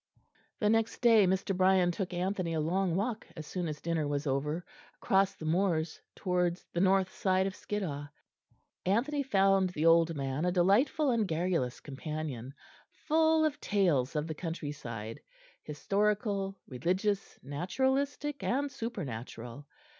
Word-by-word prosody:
The 210 - +1
next 225 +1 +2
day 225 -5 +6
Mr. 190 +1 0
Brian 185 -1 +4
took 185 +1 -3
Anthony 180 -1 -1
a - - 0
long 175 +3 +1
walk 220 +3 -2
as 155 - -6
soon 180 +2 -3
as 150 -1 -5
dinner 165 -3 -1
was 145 0 -2
over, 150 +5 -1 0.3
across 195 0 +2
the 155 - -8
moors 165 -1 0
towards 180 -1 0
the 170 - 0
north 190 0 +3
side 190 -1 +1
of 195 - -2
Skiddaw. 155 -9 -4 0.8
Anthony 255 +10 +1
found 195 -7 +3
the 160 -3 -2
old 165 0 +5
man 135 +1 -2
a 180 - +2
delightful 215 - +3
and 225 -4 +1
garrulous 165 -7 -1
companion, 140 -3 -5 0.4
full 320 0 +2
of 300 -1 -2
tales 170 -11 +1
of 150 0 0
the 160 - -4
countryside, 145 -9 -5 0.4
historical, 200 +4 -1
religious, 185 - -1
naturalistic, 265 - -1
and 280 +3 0
supernatural. 140 - -6
180 Hz, 140 wpm, -31 LUFS, 155-205 Hz, 0.8 s, day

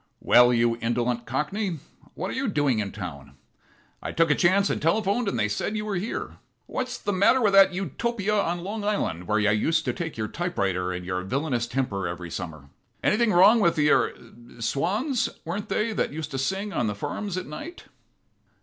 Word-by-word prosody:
Well, 120 0 +6
you 115 -1 +2
indolent 120 +1 -1
cockney, 165 - -2 0.4
what - - -3
are - - -4
you 265 0 -1
doing 145 - +1
in 100 -2 -2
town? 70 -8 -8 0.7
I - - -4
took 165 -2 +2
a - - +7
chance 190 +5 +3
and - - -2
telephoned, 200 +7 +1
and 195 - -1
they 105 - +2
said 110 - -2
you 210 - -3
were 210 - -3
here. 205 +7 -4 0.3
What's 255 - -4
the 205 - -2
matter 200 +7 +4
with 210 -5 +2
that 195 -1 +7
Utopia 200 - -2
on 175 -4 0
Long 205 +3 -4
Island 90 - -1
where 105 - +2
you 105 0 +3
used 160 +10 +1
to - - 0
take 165 -7 -5
your 110 -1 -2
typewriter 100 - -1
and 90 0 -5
your 90 0 -2
villainous 125 +3 -1
temper 110 -8 -2
every 85 0 -6
summer? 80 -7 -7 0.3
Anything 220 +1 +3
wrong 200 +6 +6
with 170 -5 +3
the 150 -1 +3
er - - +3 0.4
swans, 205 - 0 0.2
weren't 200 +6 -4
they, 220 +1 0
that - - -1
used 155 0 -5
to 135 - -3
sing 195 +8 -2
on 120 - 0
the 105 - -2
farms 180 - -4
at 185 - -3
night?" 315 - -8
160 Hz, 195 wpm, -25 LUFS, -, 0.7 s, a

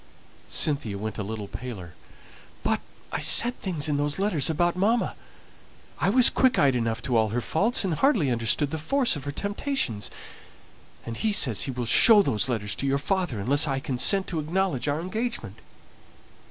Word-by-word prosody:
Cynthia 140 -10 0
went 110 +1 -6
a - - -2
little 105 0 -6
paler. 100 -10 -8 0.7
"But - - 0 0.3
I - - -3
said 245 +1 +5
things 165 -6 -2
in 145 -2 -1
those 145 0 -1
letters 190 -8 +1
about 175 +2 0
mamma. 220 +6 0 0.9
I - - +1
was 250 +4 +6
quick 260 -1 +2
eyed 135 -2 +3
enough 115 -1 -2
to 125 - -2
all 110 -1 +2
her 115 +4 -2
faults, 200 - +1
and 180 - -1
hardly 190 - +1
understood 120 +5 0
the 160 - -4
force 250 - +1
of 145 -2 -8
her 145 - -4
temptations; 200 - -3 1.0
and 115 -1 -6
he 220 - 0
says 125 - +3
he 135 - -4
will 125 -1 -4
show 205 - +6
those 120 - -1
letters 105 -4 -2
to 140 - -3
your 135 0 +1
father, 160 - -2
unless 140 +9 +2
I 135 -1 -1
consent 140 +9 +1
to 165 - -3
acknowledge 165 -3 -2
our 145 +1 -1
engagement." 185 - -5
145 Hz, 180 wpm, -25 LUFS, 120-195 Hz, 1.0 s, was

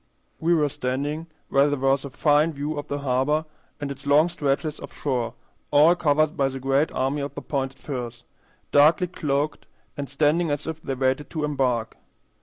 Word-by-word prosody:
We 170 +2 +3
were 150 -2 +3
standing 140 +5 -3 0.2
where 140 +1 +4
there 145 - 0
was 135 +1 +2
a - - -5
fine 150 +4 +2
view 145 +2 -3
of 145 - -7
the 145 - -2
harbor 140 +4 +1 0.3
and 145 -1 -4
its 140 +1 -8
long 150 +4 +5
stretches 150 0 -1
of - - -9
shore 125 -5 -2 0.3
all 150 +4 +6
covered 155 -3 +2
by 135 -1 +1
the 135 0 -6
great 135 +3 +1
army 135 +3 -1
of 140 - -5
the - - -5
pointed 135 -2 -2
firs, 120 -4 -6 0.5
darkly 155 +6 +5
cloaked 150 -4 -2 0.3
and 140 -2 -5
standing 150 +5 +2
as 145 0 -2
if 160 0 -5
they 135 - -3
waited 130 +2 0
to 155 -2 -3
embark. 130 -6 0
145 Hz, 185 wpm, -24 LUFS, 135-150 Hz, 0.5 s, all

